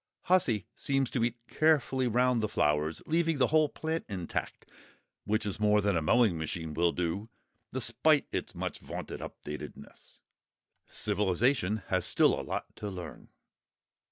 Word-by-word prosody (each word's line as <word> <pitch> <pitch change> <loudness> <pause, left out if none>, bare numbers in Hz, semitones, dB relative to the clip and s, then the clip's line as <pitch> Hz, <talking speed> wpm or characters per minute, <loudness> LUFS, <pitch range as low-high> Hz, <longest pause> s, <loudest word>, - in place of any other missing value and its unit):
"Hussy" 130 - +2
seems 135 -2 0
to 120 - 0
eat 120 0 0
carefully 135 -4 +2
round 125 0 +2
the 110 - +1
flowers, 75 -2 0
leaving 165 -1 +1
the 130 - +4
whole 155 -2 +5
plant 160 +3 -3
intact, 90 -5 -4 0.6
which 105 0 0
is 100 -1 -3
more 105 0 +4
than 100 -2 +1
a 80 - +1
mowing 90 +1 +3
machine 80 0 -4
will 85 +2 +2
do, 90 +6 -2 0.4
despite 130 +5 +2
its - - -4
much - - -4
vaunted - - -6
up - - -8
to 75 - -4
dateness. - - -11 0.7
Civilisation 105 +1 +1
has 90 -1 +1
still - - +4
a - - -2
lot - - -5
to 105 - -4
learn. 90 -5 -8
110 Hz, 155 wpm, -30 LUFS, 90-130 Hz, 0.7 s, whole